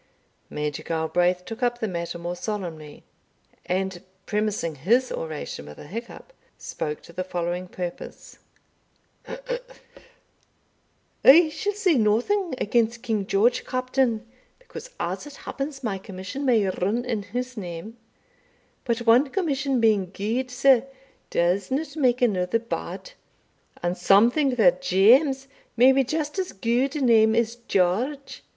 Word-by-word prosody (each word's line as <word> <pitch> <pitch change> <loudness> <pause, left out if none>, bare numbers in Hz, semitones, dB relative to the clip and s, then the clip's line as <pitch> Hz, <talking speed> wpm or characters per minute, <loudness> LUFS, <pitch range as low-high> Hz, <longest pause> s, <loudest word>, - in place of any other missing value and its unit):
Major 150 -1 -3
Galbraith 175 +3 0
took 225 +2 -8
up 240 -1 +1
the 225 - -2
matter 170 -2 -4
more 175 +1 -4
solemnly, 175 -7 -6 0.6
and, 185 -1 -2 0.2
premising 210 -5 -1
his 230 - +1
oration 160 -2 -5
with 75 - -11
a - - -11
hiccup, 230 - -8 0.2
spoke 150 -1 -5
to 170 - -14
the 185 - -3
following 175 0 -3
purpose: 180 -1 -8 2.8
"I 315 +4 +8
shall 410 +6 -2
say 375 - +2
nothing 260 - +1
against 230 +1 0
King 215 -5 -1
George, 220 +5 +2
Captain, 255 -3 0 0.3
because, - - -11
as - - -3
it 290 - -11
happens, 275 0 -6
my 200 -5 -2
commission 190 +7 -6
may 225 -6 +3
rin 200 +6 -1
in 230 -4 -2
his 250 +6 -5
name 190 +2 -7 0.9
But 235 -1 -1
one 245 +5 +5
commission 275 -7 0
being 210 -5 +3
good, 225 +7 -2
sir, 265 0 +4 0.4
does 180 +3 +1
not 295 +5 -2
make 255 -4 +2
another 185 -3 +2
bad; 230 - -6 0.7
and 175 +1 0
some 200 +5 +5
think 275 -3 +1
that 260 +4 +4
James 265 - +4 0.3
may 250 +3 +7
be 270 0 +3
just 300 +6 -3
as 370 - -3
good 240 +7 0
a 300 - -2
name 225 -3 +5
as 230 0 +1
George. 240 +6 -1
230 Hz, 135 wpm, -25 LUFS, 185-265 Hz, 2.8 s, I